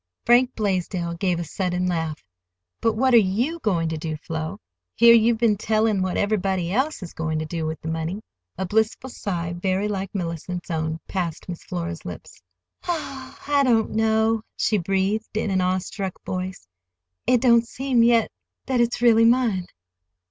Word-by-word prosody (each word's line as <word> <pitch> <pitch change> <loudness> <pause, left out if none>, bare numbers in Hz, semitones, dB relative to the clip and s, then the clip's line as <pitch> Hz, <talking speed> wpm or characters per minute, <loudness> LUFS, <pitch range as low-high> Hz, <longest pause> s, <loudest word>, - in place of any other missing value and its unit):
Frank 245 +2 +4
Blaisdell 185 -4 -1
gave 180 -2 0
a - - -2
sudden 180 +2 -2
laugh. 165 -4 -2 0.6
"But 225 - +2
what 255 +4 +2
are - - +9 0.3
you 330 +5 -4
going 175 - 0
to 160 -1 -3
do, 155 -1 -4
Flo? 160 +4 -5 0.4
Here 235 0 +8
you've 230 0 +4
been 220 -3 +2
telling 215 -1 +1
what 185 -1 -1
everybody 190 -4 0
else 265 0 0
is 170 - -9
going 160 -1 -2
to 155 - -2
do 160 0 -3
with 160 0 -4
the - - -7
money." 165 +6 -3 0.3
A 190 - -2
blissful 220 +6 0
sigh, 175 -6 -3
very 190 +3 -1
like 195 -2 -3
Mellicent's 175 0 -4
own, 160 0 -2
passed 175 -4 -3
Miss 175 -2 -7
Flora's 85 -1 -5
lips. 90 - -9 0.5
"Oh, 275 -6 -4
I 285 -1 +3
don't 235 -5 +2
know," 220 0 +2 0.2
she 215 - +2
breathed 195 +5 -1
in 215 -2 0
an 190 -1 +2
awe 185 +1 +2
struck 190 0 -5
voice. 185 - -5 0.6
"It 250 - +4
don't 235 -1 +4
seem 260 -1 +1
yet—that 235 +2 +1
it's 240 0 0
really 230 -1 +6
mine." 230 -7 +2
195 Hz, 170 wpm, -23 LUFS, 175-230 Hz, 0.6 s, are